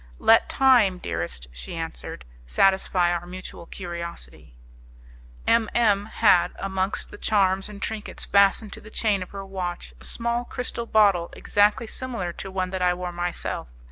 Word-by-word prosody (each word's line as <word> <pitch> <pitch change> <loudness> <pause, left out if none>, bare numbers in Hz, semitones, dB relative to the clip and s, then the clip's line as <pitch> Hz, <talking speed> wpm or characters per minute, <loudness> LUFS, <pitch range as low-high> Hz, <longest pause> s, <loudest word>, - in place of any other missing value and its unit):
"Let 225 0 +5
time, 245 -9 +4
dearest," 85 - -4
she - - -8
answered, 60 0 -6 0.2
"satisfy 185 - +3
our 175 0 -3
mutual 180 -1 -9
curiosity." 170 - -7 0.9
M 230 -2 +3
M 210 -3 +3
had, 200 -6 +4
amongst 190 0 -2
the - - -10
charms 195 -2 +2
and 205 -1 -9
trinkets 215 +1 -4
fastened 200 +1 +3
to - - -9
the 215 - -12
chain 210 -3 +1
of 185 - -6
her 195 -1 -7
watch, 180 - -5
a - - -13
small 235 - -1
crystal 240 -2 -4
bottle 200 -6 +4
exactly 205 +2 +2
similar 225 -7 -4
to 195 - -7
one 185 -1 -2
that 190 -1 -3
I 180 0 +3
wore 180 0 -4
myself. 175 - -3
190 Hz, 155 wpm, -25 LUFS, 175-210 Hz, 0.9 s, Let